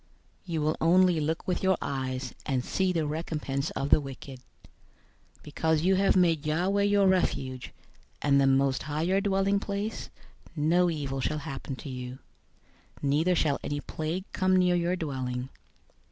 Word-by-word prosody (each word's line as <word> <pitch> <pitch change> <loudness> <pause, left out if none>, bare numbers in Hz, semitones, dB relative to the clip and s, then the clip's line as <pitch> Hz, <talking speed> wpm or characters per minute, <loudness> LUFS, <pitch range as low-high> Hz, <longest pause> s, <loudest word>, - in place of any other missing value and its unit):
091:008 - - -37 0.5
You 160 - 0
will 155 +1 0
only 180 0 +4
look 160 +2 -2
with 180 - -1
your 190 -1 +3
eyes, 130 -1 -3
and 130 -4 0
see 190 -1 0
the 165 -3 0
recompense 150 -2 -3
of 140 - -2
the - - +6
wicked. 135 -1 -9 1.0
091:009 - - -22
Because 160 +1 0
you 190 +2 +4
have 195 +1 +3
made 165 -5 +3
Yahweh 180 +6 +1
your 205 0 +3
refuge, 130 -9 0 0.5
and 140 -1 +3
the 135 - +4
Most 135 0 +2
High 155 +1 -3
your 190 +3 +2
dwelling 195 0 +1
place, 205 +2 -4 0.5
091:010 145 - -1
no 175 +2 +4
evil 140 -4 -3
shall 150 +4 -1
happen 135 -1 -6
to 140 - -9
you, 125 0 -6 0.9
neither 155 +6 +2
shall 150 -4 +1
any 145 0 -2
plague 160 +5 -4
come 185 -1 +2
near 180 -1 +3
your 175 +1 +1
dwelling. 130 -6 -4
155 Hz, 170 wpm, -28 LUFS, 140-185 Hz, 1.0 s, the